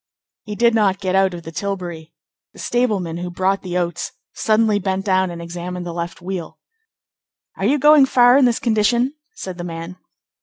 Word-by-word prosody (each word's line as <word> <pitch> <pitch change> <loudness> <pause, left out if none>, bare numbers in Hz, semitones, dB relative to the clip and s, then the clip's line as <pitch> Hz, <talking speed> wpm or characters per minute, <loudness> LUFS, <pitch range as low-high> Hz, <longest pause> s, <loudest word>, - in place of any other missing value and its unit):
He 210 -1 -5
did 235 +1 +3
not 200 -3 +2
get 185 -2 -2
out 190 -1 +2
of 170 - -9
the 165 - -8
tilbury. 175 -4 -5 0.4
The - - -15
stableman 205 -9 -1
who 180 +1 -4
brought 190 +2 0
the 180 -1 -3
oats 175 -1 -2 0.2
suddenly 215 -1 +2
bent 190 0 -2
down 190 -2 +2
and 170 -1 -7
examined 175 +1 -6
the 170 - -5
left 170 +1 -5
wheel. 180 -3 -5 1.0
"Are 195 - -3
you 275 +7 +3
going 295 -1 +6
far 245 -1 +5
in 275 -1 +5
this 240 -2 +2
condition?" 235 +3 +1 0.2
said 185 -2 -7
the - - -4
man. 165 +1 -7
190 Hz, 185 wpm, -20 LUFS, 175-220 Hz, 1.0 s, going